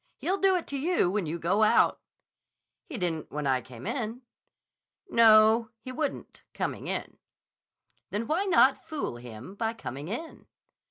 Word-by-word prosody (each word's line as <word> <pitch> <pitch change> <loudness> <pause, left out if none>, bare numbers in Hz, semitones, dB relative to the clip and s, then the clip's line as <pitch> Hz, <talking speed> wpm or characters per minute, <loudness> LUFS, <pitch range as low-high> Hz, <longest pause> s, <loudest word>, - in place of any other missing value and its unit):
He'll 385 +2 -1
do 385 -1 +4
it 355 - -1
to 280 - -4
you 325 - +1
when 200 -4 -1
you 165 +3 -3
go 175 +6 +1
out." 215 - +4 0.9
"He 295 - -6
didn't 170 -5 -3
when 150 0 -3
I 130 -2 +2
came 125 0 -12
in." 240 0 -3 0.8
"No, 225 - +6
he 255 +4 -8
wouldn't, 285 +2 -4
coming - - -3
in." - - -4 0.9
"Then 210 +3 -2
why 335 - 0
not 330 -8 +4
fool 305 - -4
him 120 - -10
by 225 +2 -2
coming 140 - -7
in?" 280 - -7
220 Hz, 155 wpm, -28 LUFS, -, 0.9 s, No